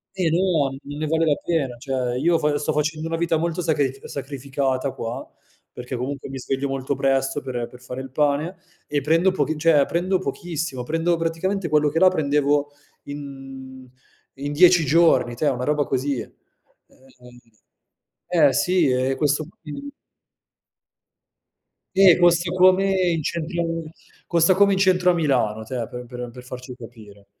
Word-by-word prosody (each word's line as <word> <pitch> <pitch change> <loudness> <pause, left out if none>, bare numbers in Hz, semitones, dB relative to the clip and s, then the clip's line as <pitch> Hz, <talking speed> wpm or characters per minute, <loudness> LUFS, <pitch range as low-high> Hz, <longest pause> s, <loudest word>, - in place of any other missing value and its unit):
Eh 180 -4 +1
no, 170 -5 +2
n 135 - -8
non 145 +1 -8
ne 155 - -2
vale 160 +1 +1
la 150 -2 +3
pena. 140 -8 -2
Cioè 125 -1 -2
io 165 +4 +2
fo 150 -1 +1
sto 150 +1 -1
facendo 155 +2 -1
una 165 0 -2
vita 165 -1 +1
molto 170 +2 -2
sacrif 145 -5 -1
sacrificata 135 -1 -3
qua, 115 -1 -6 0.4
perché 125 +1 -7
comunque 135 +2 -5
mi 135 - -6
sveglio 135 +2 -2
molto 135 0 -2
presto 135 +1 0
per, 130 -2 -7
ehm, 120 -1 -3
per 125 0 -15
fare 125 +1 -7
il 135 - -8
pane, 150 +5 0 0.3
e 145 -1 -1
prendo 165 +6 +3
pochi 155 -3 -1
cioè 150 -3 +4
prendo 185 +3 0
pochissimo, 165 -8 -4
prendo 165 +5 0
praticamente 165 +3 -2
quello 150 0 +3
che 165 +3 -1
là 185 - +7
prendevo 145 -3 +1 0.3
in 135 -2 -9 0.5
in 145 +1 -3
10 175 0 +6
giorni, 160 -5 +3
te, 150 - 0
una 125 -3 0
roba 150 +2 +1
così. 135 0 -1
E - - -8 0.6
ehm, 125 -2 -19 1.1
eh - - -2
sì, 180 -4 +2
e 130 +1 +1
questo 150 0 0 0.2
qui 165 - -8 2.1
Eh 190 -3 +7
costa 175 0 +3
come 185 +1 +4 0.2
in 165 -3 -1
centro 170 +2 -2 0.6
costa 170 +2 +4
come 200 +1 +4
in - - 0
centro 180 -2 +4
a - - +1
Milano, 125 -10 0
tè, 115 0 -4
per 125 0 -8
per, 125 0 -10
ehm, 125 -1 -5
per 125 +1 -12
farci 125 0 -9
capire. 110 -5 -14
145 Hz, 165 wpm, -22 LUFS, 130-165 Hz, 2.1 s, là